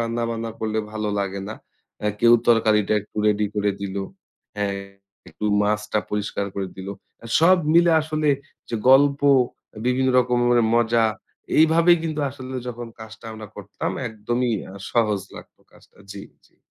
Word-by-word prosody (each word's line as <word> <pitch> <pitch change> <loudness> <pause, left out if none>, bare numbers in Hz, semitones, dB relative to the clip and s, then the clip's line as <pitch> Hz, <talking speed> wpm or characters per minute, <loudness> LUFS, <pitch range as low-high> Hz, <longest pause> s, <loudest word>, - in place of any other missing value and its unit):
রান্না-বান্না 115 0 -2
করলে 110 0 -1
ভালো 105 -1 -3
লাগে 100 0 -2
না। 110 - -5 0.5
আ - - +1
কেউ 120 0 +6 0.2
তরকারিটা 110 -3 +3
একটু 105 - -19
রেডি 105 0 +2
করে 105 0 +1
দিলো 100 0 -3 0.5
হ্যাঁ 100 -1 -1 0.5
একটু - - -8 0.2
মাছটা 105 +1 0
পরিষ্কার 105 -1 -2
করে 100 -1 -3
দিল। 95 0 -7 0.5
সব 180 +3 +6 0.2
মিলে 170 0 +6
আসলে 155 -1 -1 0.4
যে - - -4 0.2
গল্প 140 +1 +5 0.7
বিভিন্ন 130 +1 +2
রকমের 120 -1 +3
মজা 115 -1 +3 0.5
এইভাবেই 165 +2 +5
কিন্তু 155 -2 -3
আসলে 130 -1 -9
যখন 120 0 -6
কাজটা 110 +1 -11
আমরা 110 -1 -9
করতাম 100 0 -5 0.2
একদমই 120 +3 -2 0.4
সহজ 105 -4 +1 0.2
লাগত - - -13 0.2
কাজটা। - - -22 0.2
জি, 100 - -8 0.2
জি। - - -34
115 Hz, 140 wpm, -23 LUFS, 105-130 Hz, 0.7 s, কেউ